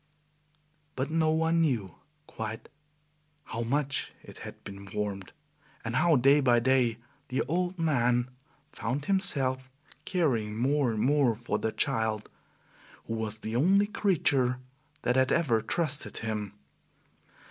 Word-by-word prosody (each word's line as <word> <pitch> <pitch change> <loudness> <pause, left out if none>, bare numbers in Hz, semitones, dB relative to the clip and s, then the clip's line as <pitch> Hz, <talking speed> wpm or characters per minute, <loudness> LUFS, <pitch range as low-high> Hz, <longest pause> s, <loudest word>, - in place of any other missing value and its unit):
But 130 +3 -2
no 160 -1 +2
one 160 +1 +2
knew 120 - -1 0.3
quite 110 -3 -6 0.7
how 115 - -5
much 135 +3 -1
it - - -12
had - - -10
been 100 0 -9
warmed, 100 -2 -3 0.5
and 115 +2 -2
how 160 +3 +4
day 140 +3 +5
by 125 -4 +4
day 125 -2 +2 0.3
the 130 +2 0
old 180 +2 -1
man 125 -6 +1 0.4
found 140 +1 -3
himself 135 -9 0 0.4
caring 120 - 0
more 135 +1 +2
and 110 - -2
more 135 -3 +3
for 120 +2 -2
the 110 - -1
child, 110 -3 -1 0.7
who - - -4
was 110 -1 -3
the 110 +1 -4
only 190 +10 +4
creature 145 -12 +1 0.5
that 125 - +2
had 130 0 +3
ever 125 -10 +2
trusted 150 +2 -1
him. 105 -3 -3
130 Hz, 130 wpm, -29 LUFS, 115-150 Hz, 0.7 s, day